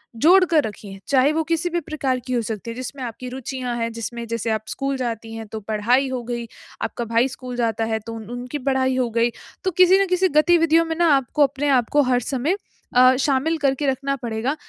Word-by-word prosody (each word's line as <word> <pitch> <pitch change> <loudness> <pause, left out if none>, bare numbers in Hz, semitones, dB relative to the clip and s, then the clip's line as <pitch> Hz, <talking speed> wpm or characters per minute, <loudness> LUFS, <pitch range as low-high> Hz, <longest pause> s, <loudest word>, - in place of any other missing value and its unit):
जोड़ 350 +10 +6
कर 320 -4 +3
रखिए। 200 -3 -7
चाहे 275 +1 +4
वो 320 +1 0
किसी 330 +2 -1
भी 345 0 -1
प्रकार 280 -5 -2
की 255 - -2
हो 240 - +1
सकती 220 0 -5
है - - -8
जिसमें 255 +2 -6
आपकी 245 +1 -6
रुचियाँ 255 -1 -4
हैं, 230 0 -2
जिसमें 235 +1 -5
जैसे 230 0 -2
आप 220 0 -1
स्कूल 275 0 -2
जाती 225 -3 -4
हैं 225 0 -6
तो 220 - -6
पढ़ाई 220 +6 +1
हो 255 -1 -3
गई, 235 -1 -4 0.3
आपका 235 - -3
भाई 230 +3 +2
स्कूल 255 -1 -8
जाता 225 -2 0
है 220 0 -1
तो 230 - -5
उनकी 245 +5 -6
पढ़ाई 260 -1 +1
हो 250 -2 +1
गई, 230 +1 +2 0.3
तो 375 - 0
किसी 365 +2 +6
न - - +3
किसी 365 +1 +2
गतिविधियों 330 +1 +4
में 325 - -3
ना 345 - +4
आपको 275 +3 +1
अपने 280 +1 0
आपको 265 +2 +3
हर 245 - +3
समय 270 - -1 0.4
अ, 255 +1 +7
शामिल 280 +4 +1
करके 280 -1 0
रखना 275 +1 0
पड़ेगा, 240 +1 -2
255 Hz, 215 wpm, -22 LUFS, 230-290 Hz, 0.4 s, अ